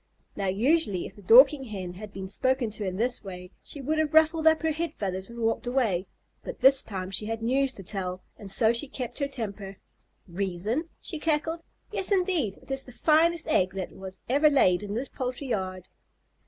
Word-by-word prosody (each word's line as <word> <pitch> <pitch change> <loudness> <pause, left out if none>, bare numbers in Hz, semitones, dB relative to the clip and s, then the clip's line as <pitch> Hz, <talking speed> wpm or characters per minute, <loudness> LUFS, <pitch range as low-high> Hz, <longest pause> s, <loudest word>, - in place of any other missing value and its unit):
Now, 200 -1 -2
usually 215 - +2
if - - -10
the 205 - -14
Dorking 265 +7 +7
Hen 190 -6 -6
had 205 +3 -9
been 190 -1 -7
spoken 255 +3 0
to 210 - -5
in 185 - -3
this 240 +5 0
way, 180 -1 -9
she 285 - -7
would 310 +4 -1
have 310 -1 0
ruffled 315 0 +4
up 320 0 +4
her 320 - +2
head 330 +2 -3
feathers 190 0 -3
and 235 0 -6
walked 225 +2 0
away, 225 -8 0 0.4
but - - -7
this 270 0 +7
time 190 -3 -5
she 210 +2 -1
had 225 0 -4
news 265 +3 +2
to 195 - -11
tell 185 -1 -5
and 200 - -10
so 220 +3 +3
she 235 +5 +1
kept 255 -1 -6
her 280 - 0
temper. 200 -7 -6 0.5
"Reason?" 200 - -2
she 320 - -5
cackled. 320 +2 -1 0.3
"Yes 385 - +2
indeed! 360 - +1
It - - -11
is 270 0 0
the 250 - -11
finest 320 +5 +2
egg 190 -11 +1
that 190 -2 -4
was 190 0 -10
ever 290 +5 +4
laid 185 -11 +3
in 205 0 -5
this 255 +4 -2
poultry 255 +1 -5
yard." 185 -4 -3
235 Hz, 205 wpm, -27 LUFS, 195-290 Hz, 0.5 s, Dorking